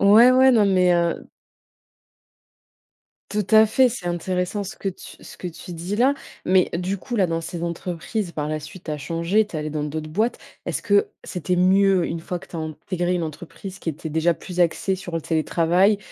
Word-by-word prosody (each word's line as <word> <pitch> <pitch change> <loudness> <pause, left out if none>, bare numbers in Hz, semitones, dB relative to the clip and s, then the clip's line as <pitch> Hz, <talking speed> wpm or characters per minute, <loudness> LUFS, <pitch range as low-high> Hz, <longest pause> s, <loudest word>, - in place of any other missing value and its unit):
Ouais, 215 +5 +8
ouais, 260 +1 +6
non, 220 -4 +5
mais 185 -2 +4
heu 170 -1 0 2.0
Tout 210 -2 -1
à 220 0 +7
fait, 255 +4 +4
c'est 225 -7 -6
intéressant 180 +3 -2
ce 195 - -8
que 195 - -3
tu 185 - -12
ce - - -11
que 180 - -5
tu 165 +1 -10
dis 175 +5 -4
là. 260 +4 +4 0.3
Mais 185 -1 +4
du 185 +3 -2
coup 240 +6 -5
là, 195 -4 +3
dans 165 -1 -1
ces 165 +1 -6
entreprises 175 +3 -3
par 150 -2 -3
la 155 0 -2
suite 155 +4 -11
tu - - -5
as 150 - -3
changé, 170 +8 +1
tu 190 - -7
es - - -1
allée 155 0 -3
dans 150 0 -2
d'autres 155 +1 -4
boîtes. 220 +8 0 0.3
Est-ce - - -2
que 205 0 +3 0.2
c'était 180 0 -2
mieux 190 0 +4
une 165 - -4
fois 175 +2 -4
que 190 - -14
tu 175 - -9
as - - -3
intégré 175 +3 -2
une 175 - -1
entreprise 175 +4 -7
qui - - -6
était 160 +1 -4
déjà 160 +2 +2
plus 180 -1 -6
axée 175 +3 +2
sur 180 -2 -7
le 165 - -2
télétravail 170 +5 +2
180 Hz, 210 wpm, -23 LUFS, 165-200 Hz, 2.0 s, Ouais